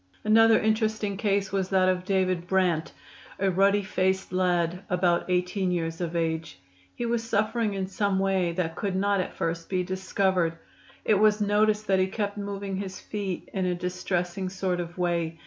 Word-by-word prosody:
Another 225 +1 +6
interesting 215 -2 0
case 200 -1 0
was 190 -1 -1
that 190 -1 +3
of 185 -1 0
David 185 -2 0
Brant, 180 -4 +1 0.5
a 195 0 +1
ruddy 200 +2 +3
faced 190 -1 -1
lad 180 -1 +1
about 180 -1 +1
18 180 +1 0
years 165 -1 -2
of 170 -1 -3
age. 160 - -2 0.4
He 240 - -3
was 235 -1 0
suffering 220 -1 0
in 190 -1 -1
some 195 +1 0
way 190 -2 +1
that 165 -2 -2
could 195 -3 -2
not 200 +1 +2
at - - -6
first 165 0 -3
be 185 -1 0
discovered. 185 -2 0 0.5
It 210 -2 +3
was 215 0 +4
noticed 210 +1 +2
that 190 -2 +2
he 185 - +3
kept 205 +1 -3
moving 200 -1 -4
his 190 -1 -5
feet 200 -4 -4
in 190 -2 0
a 180 - 0
distressing 180 +1 -2
sort 185 -1 -2
of 175 0 -6
way. 170 -2 -1
190 Hz, 175 wpm, -27 LUFS, 180-200 Hz, 0.5 s, Another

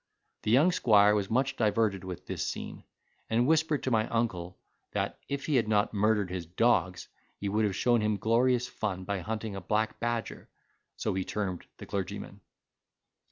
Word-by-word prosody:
The - - -3
young 140 +10 +5
squire 105 - +5
was 100 -2 0
much 130 +4 +1
diverted 105 -3 +1
with 90 -1 -7
this - - -3
scene, - - -6 0.4
and 115 +2 +2
whispered 155 0 +2
to 130 - -1
my 110 -1 +2
uncle, 95 -7 -2 0.4
that - - -2
if 140 0 -3
he 150 -4 +2
had 115 - +1
not 105 -1 +2
murdered 105 -2 +2
his 90 -3 -4
dogs, 90 -2 +1 0.3
he 100 - -4
would 105 +2 +1
have 100 -3 -1
shown 120 +1 +3
him 105 -1 +1
glorious 125 +3 +2
fun, 95 -3 -3
by 100 +1 -2
hunting 110 +2 -4
a 95 - -5
black 110 +4 -1
badger 120 -1 -3 0.5
(so - - -1
he 95 0 -1
termed 95 -3 -4
the - - -9
clergyman). 95 -2 -5
110 Hz, 175 wpm, -29 LUFS, 95-120 Hz, 0.5 s, young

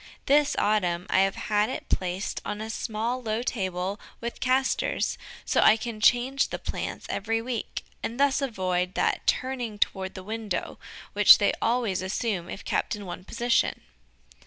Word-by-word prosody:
This 290 +1 +4
autumn 180 -4 +1
I - - +4
have 195 0 +3
had 210 0 +1
it 260 - -5
placed 185 +2 -2
on 210 - -4
a 220 +1 -4
small, 225 +3 -2
low 225 0 -2
table 190 -3 -2 0.2
with 235 0 -5
castors, 260 +1 +1 0.3
so - - +2
I 220 - +7
can 225 -1 -6
change 250 +5 +3
the - - -4
plants - - -5
every 225 +2 -1
week, 235 -1 -4 0.2
and 235 +3 -4
thus 280 0 +3
avoid 185 -7 -1
that - - 0
turning 250 -5 -1
toward 190 -2 -1
the 185 - -7
window 215 -2 -4 0.3
which - - +9
they - - +2
always 230 -6 +1
assume 190 -1 -2
if - - -7
kept - - 0
in 205 -1 -8
one 180 0 -7
position. 235 +3 +1
215 Hz, 160 wpm, -27 LUFS, 190-240 Hz, 0.3 s, which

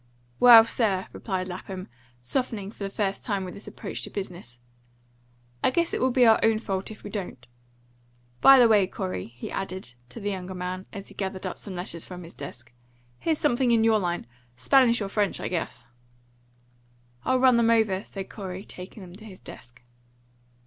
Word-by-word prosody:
"Well, 235 -2 +10
sir," 205 -5 0
replied 185 -3 -3
Lapham, 185 +1 -7 0.4
softening 205 - -2
for 210 - -9
the 195 - -2
first 195 -1 -2
time 200 -4 -1
with 180 - -7
this 200 - -10
approach - - -6
to - - -5
business, 175 - -7 1.1
"I - - +5
guess 335 +6 0
it - - -1
will 260 - +3
be 250 0 +4
our 225 -1 +6
own 225 -1 +4
fault 195 -3 -3
if 220 - -11
we 205 - -7
don't. 180 - -6 1.0
By 270 0 +9
the 245 -2 +7
way, 210 -4 +4
Corey," 90 - -4
he 120 +1 -9
added, 190 -9 -4 0.2
to - - -8
the 205 -1 -2
younger 185 -1 -5
man, 180 +1 -5
as 200 0 -9
he - - -13
gathered 190 -1 -4
up 185 - -4
some 195 -3 -6
letters 175 -2 -4
from 180 -1 -9
his 165 - -11
desk, 120 -4 -10 0.5
"here's 320 -2 0
something 260 -4 +2
in 230 -1 +4
your 225 -1 +4
line. 175 - -2 0.3
Spanish 235 - +4
or - - -3
French, 200 0 0
I - - -3
guess." 165 -9 -4 1.4
"I'll 260 - +2
run 255 -2 +5
them 230 -1 +3
over," 215 -4 +2
said 195 -1 -7
Corey, 190 -1 -7
taking 185 +3 -10
them 175 -1 -12
to 215 - -13
his 190 -4 -11
desk. 120 +1 -13
195 Hz, 190 wpm, -26 LUFS, 180-225 Hz, 1.4 s, Well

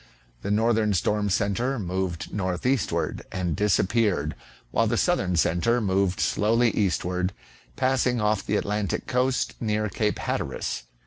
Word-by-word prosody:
The 100 - -4
northern 110 -1 +2
storm 105 +3 +1
centre 110 +8 0
moved 95 -4 -3
northeastward 95 - -1
and 90 -4 -1
disap 105 -1 +2
peared, 100 -10 +1 0.4
while - - +2
the - - 0
southern 90 -2 +1
centre 90 +9 +2
moved 95 -3 +1
slowly 115 +3 +2
eastward, 90 -1 0 0.4
passing 130 -2 +1
off 105 -2 +1
the - - -1
Atlantic 105 -1 -2
coast 125 0 0
near 105 -1 0
Cape 105 +2 0
Hatteras. - - -3
105 Hz, 130 wpm, -25 LUFS, 90-115 Hz, 0.4 s, northern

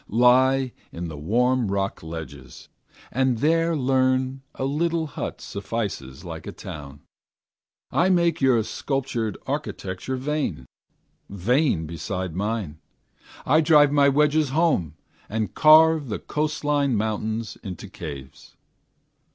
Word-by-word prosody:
Lie 130 +3 +4 0.2
on 85 0 -5
the 80 - -7
warm 120 - +1
rock 100 0 -2
ledges, 80 -6 -9 0.4
and 130 -1 +1
there 165 +5 +2
learn 130 -1 +1
A 130 - -2
little 165 +4 0
hut 150 - -5
suffices 100 - -5
like 80 -2 -7
a - - -4
town. 70 -2 -9 0.9
I 180 - +3
make 170 -3 +2
your 125 -4 +4
sculptured 125 -3 -3
architecture 95 +7 -4
vain, 135 - -2 0.6
Vain 105 - +1
beside 90 +2 -4
mine. 100 -6 -3 0.7
I 155 +4 +4
drive 150 -2 +5
my 140 -1 +5
wedges 150 +1 +2
home, 135 - +1 0.3
And 110 -2 -2
carve 155 -1 +6
the 105 - -2
coastwise 150 -1 -1
mountain 110 0 -1 0.2
into 95 0 -7
caves. 70 -8 -9
125 Hz, 115 wpm, -24 LUFS, 95-145 Hz, 0.9 s, carve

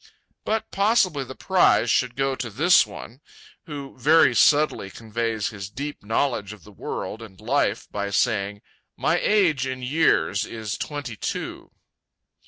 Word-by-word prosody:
But 220 +1 -2
possibly 200 - +2
the 130 0 -9
prize 180 -10 +3
should 125 -2 +1
go 135 +1 0
to 120 -2 -5
this 155 - +4
one, 115 +5 -11 0.5
who 140 -3 -7
very 155 +6 +5
subtly 150 -9 +3
conveys 110 +1 -3
his 100 -3 -7
deep 145 +6 -6
knowledge 110 -1 -1
of 105 -5 -15
the - - -15
world 110 - -6
and 100 -5 -12
life - - 0
by 100 0 -3
saying: 100 -1 0 0.3
"My - - +1
age, 170 -11 +2
in 130 -1 -5
years, 130 -7 +2
is 110 -1 -5
twenty 145 -6 -5
two." - - -5
125 Hz, 145 wpm, -24 LUFS, 105-150 Hz, 0.5 s, very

